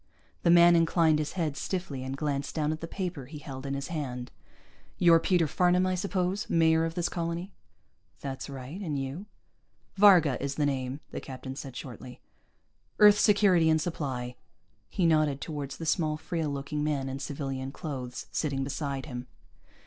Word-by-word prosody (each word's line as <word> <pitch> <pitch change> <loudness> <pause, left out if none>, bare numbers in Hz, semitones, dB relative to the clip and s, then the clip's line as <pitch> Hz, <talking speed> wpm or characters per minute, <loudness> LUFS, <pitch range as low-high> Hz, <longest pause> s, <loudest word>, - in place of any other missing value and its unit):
The 170 - +2
man 175 0 +7
inclined 165 -2 +3
his 150 - -3
head 160 -6 -1
stiffly 155 -5 -4
and 130 +1 -4
glanced 140 -1 -2
down 155 -1 +1
at 155 - -4
the 165 - -4
paper 180 -7 -4
he 150 +2 -9
held 140 -2 -7
in 135 - -2
his 140 0 -5
hand. 125 -6 -4 0.7
"You're 170 -2 +6
Peter 175 -1 +2
Farnam, 180 +4 +2
I 185 - +1
suppose? 185 +1 -1
Mayor 160 -1 +4
of 165 0 -4
this 175 -1 0
colony?" 170 +3 -4 0.7
"That's 135 0 -6
right. 135 +7 -7
And 155 -7 -2
you?" 140 +9 -5 0.7
"Varga 180 -9 +6
is 140 0 -2
the 150 - +1
name," 135 0 -2
the - - -5
captain 130 0 -7
said 135 -2 -8
shortly. 125 0 -9 0.8
"Earth 210 0 +7
Security 200 -6 +4
and 160 0 +4
Supply." 130 -7 -3 0.5
He 180 - 0
nodded 155 -4 +3
toward 145 0 -5
the 165 +4 -7
small, 155 -2 +1
frail 160 0 -3
looking 145 +1 -3
man 145 -3 -1
in 135 +1 -4
civilian 135 -1 -4
clothes, 130 -5 -6
sitting 140 -3 -1
beside 140 -1 -3
him. 125 -4 -7
150 Hz, 170 wpm, -29 LUFS, 135-170 Hz, 0.8 s, man